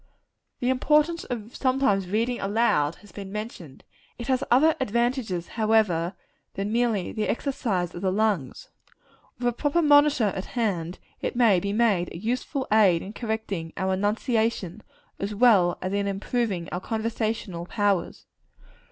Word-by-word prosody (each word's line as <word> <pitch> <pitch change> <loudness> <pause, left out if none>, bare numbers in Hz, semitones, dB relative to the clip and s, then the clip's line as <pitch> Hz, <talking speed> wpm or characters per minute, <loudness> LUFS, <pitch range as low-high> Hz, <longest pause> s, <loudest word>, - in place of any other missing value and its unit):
The 250 +1 +2
importance 300 +5 +2
of 230 -2 -6
sometimes 255 -8 +1
reading 230 +4 0
aloud, 195 -8 +1
has 205 - -16
been 195 -2 -8
mentioned. 205 - -7 0.3
It 235 - -6
has 260 0 +2
other 305 +6 +5
advantages, 235 -6 -1
however, 215 -6 +1 0.4
than 200 +2 -2
merely 230 -5 0
the 215 -1 -2
exercise 210 - -1
of 175 - -7
the 190 -1 +1
lungs. 200 -9 -1 0.7
With 245 - -1
a 245 - +1
proper 295 +7 +1
monitor 290 -8 +4
at 190 - -4
hand, 185 -8 -2 0.2
it - - -3
may 225 -7 +4
be 200 +3 -3
made 205 -5 +2
a - - -7
useful 250 - -2
aid 195 -6 +4
in 200 - -8
correcting 220 -8 -4
our 190 0 0
enunciation, 220 0 -1 0.4
as 200 +1 -3
well 200 -7 +4
as 185 +1 -2
in 200 0 0
improving 200 -2 -2
our 180 - -3
conversational 220 -5 -3
powers. 205 -3 -1
215 Hz, 145 wpm, -25 LUFS, 190-240 Hz, 0.7 s, other